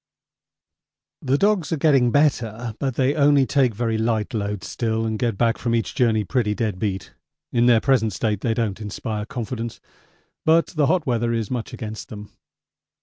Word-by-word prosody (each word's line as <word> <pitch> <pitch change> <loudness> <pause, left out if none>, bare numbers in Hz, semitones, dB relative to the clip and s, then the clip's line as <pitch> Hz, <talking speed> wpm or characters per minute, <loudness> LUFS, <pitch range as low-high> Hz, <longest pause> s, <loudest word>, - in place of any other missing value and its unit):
The 135 +1 +1
dogs 200 -2 +1
are 165 - +1
getting 135 -5 +4
better, 120 -5 +1
but 135 -3 -2
they 130 +1 +2
only 145 -2 +4
take 130 -5 +2
very 115 0 -1
light 110 +1 -1
loads 105 -2 -3
still 115 -2 -1
and 110 -1 -2
get 115 -5 0
back 115 0 +1
from 115 -1 0
each 115 - -1
journey 115 -5 +2
pretty 105 -1 0
dead 105 -5 -2
beat. 100 -3 -3 0.4
In 120 0 +3
their 120 -2 +6
present 125 -4 +2
state 105 0 -1
they 115 -1 0
don't 110 -3 -2
inspire 105 +1 -4
confidence, 115 -1 -5 0.6
but 165 +1 +3
the 150 -5 +1
hot 180 0 +1
weather 120 -2 0
is 115 -3 -2
much 120 -3 -3
against 110 +3 -7
them. 105 -3 -9
115 Hz, 175 wpm, -22 LUFS, 110-135 Hz, 0.6 s, their